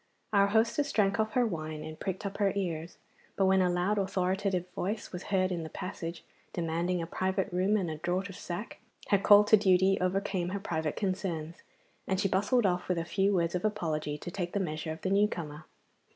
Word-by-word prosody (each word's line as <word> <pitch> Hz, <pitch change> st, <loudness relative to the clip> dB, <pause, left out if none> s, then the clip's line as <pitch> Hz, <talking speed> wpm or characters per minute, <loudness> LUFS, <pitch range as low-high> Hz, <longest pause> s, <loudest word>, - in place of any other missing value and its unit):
Our 200 Hz, -1 st, +5 dB
hostess 230 Hz, +7 st, +2 dB
drank 200 Hz, -3 st, +2 dB
off 220 Hz, 0 st, 0 dB
her 250 Hz, -1 st, +3 dB
wine 155 Hz, -6 st, -4 dB
and 155 Hz, 0 st, -8 dB
pricked 190 Hz, +1 st, -4 dB
up 200 Hz, -, -4 dB
her 200 Hz, -1 st, +3 dB
ears, 170 Hz, -4 st, -3 dB, 0.4 s
but 195 Hz, -, +2 dB
when 190 Hz, 0 st, +4 dB
a 180 Hz, -, +3 dB
loud 180 Hz, +4 st, +1 dB
authoritative 190 Hz, -1 st, 0 dB
voice 205 Hz, +4 st, -3 dB
was 180 Hz, 0 st, -6 dB
heard 185 Hz, -2 st, +1 dB
in 175 Hz, -2 st, -2 dB
the 160 Hz, -, -6 dB
passage, 170 Hz, -3 st, -6 dB, 0.3 s
demanding 170 Hz, +1 st, -1 dB
a -, -, -3 dB
private 190 Hz, +2 st, -1 dB
room 190 Hz, +4 st, +2 dB
and 190 Hz, -4 st, -1 dB
a 155 Hz, -1 st, -4 dB
draught 180 Hz, +4 st, -1 dB
of 195 Hz, -, -9 dB
sack, 180 Hz, +6 st, -6 dB, 0.3 s
her 200 Hz, -, +4 dB
call 205 Hz, +1 st, +7 dB
to 215 Hz, +1 st, +6 dB
duty 190 Hz, -1 st, +4 dB
overcame 185 Hz, -1 st, 0 dB
her 200 Hz, +2 st, -3 dB
private 160 Hz, -5 st, -2 dB
concerns, 180 Hz, -4 st, -2 dB, 0.5 s
and 190 Hz, -1 st, 0 dB
she 195 Hz, -, +2 dB
bustled 205 Hz, +5 st, +2 dB
off 180 Hz, -1 st, +1 dB
with 180 Hz, -, 0 dB
a 165 Hz, -, -1 dB
few 195 Hz, +3 st, +1 dB
words 170 Hz, -2 st, +1 dB
of 180 Hz, -, -2 dB
apology 160 Hz, -8 st, -1 dB
to 175 Hz, -, -7 dB
take 175 Hz, -2 st, -4 dB
the 200 Hz, -, +1 dB
measure 155 Hz, -3 st, -3 dB
of 160 Hz, 0 st, -7 dB
the 190 Hz, -, -1 dB
new 205 Hz, +1 st, +4 dB
comer. 155 Hz, -5 st, -6 dB
185 Hz, 210 wpm, -30 LUFS, 170-200 Hz, 0.5 s, call